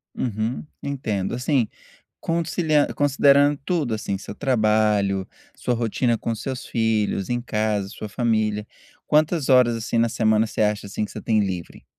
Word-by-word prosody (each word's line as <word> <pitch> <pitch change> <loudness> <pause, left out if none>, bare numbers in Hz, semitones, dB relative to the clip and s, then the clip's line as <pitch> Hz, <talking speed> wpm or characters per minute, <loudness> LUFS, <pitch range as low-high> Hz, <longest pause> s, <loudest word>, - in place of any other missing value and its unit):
Uhum, 115 +3 -2 0.2
entendo, 110 -9 -2
Assim, 125 -2 +1 0.5
consili 165 -1 -1 0.2
considerando 145 0 +4
tudo, 150 -11 0
assim, 100 -2 -3
seu 100 - -8
trabalho, 105 -6 +1 0.3
sua 125 - -1
rotina 115 0 0
com 115 - -2
seus 130 +3 -5
filhos 110 -4 0
em 120 0 0
casa, 105 -4 -1
sua 105 - -7
família, 110 -1 0 0.4
quantas 155 -1 +2
horas, 125 -3 +5
assim, 115 +1 -3
na 115 - +3
semana 110 -1 +2
você 110 - -5
acha, 105 -1 +1
assim, 100 +2 -3
que - - -8
você - - -8
tem 110 -2 +2
livre? 95 -4 -4
115 Hz, 150 wpm, -23 LUFS, 105-130 Hz, 0.5 s, horas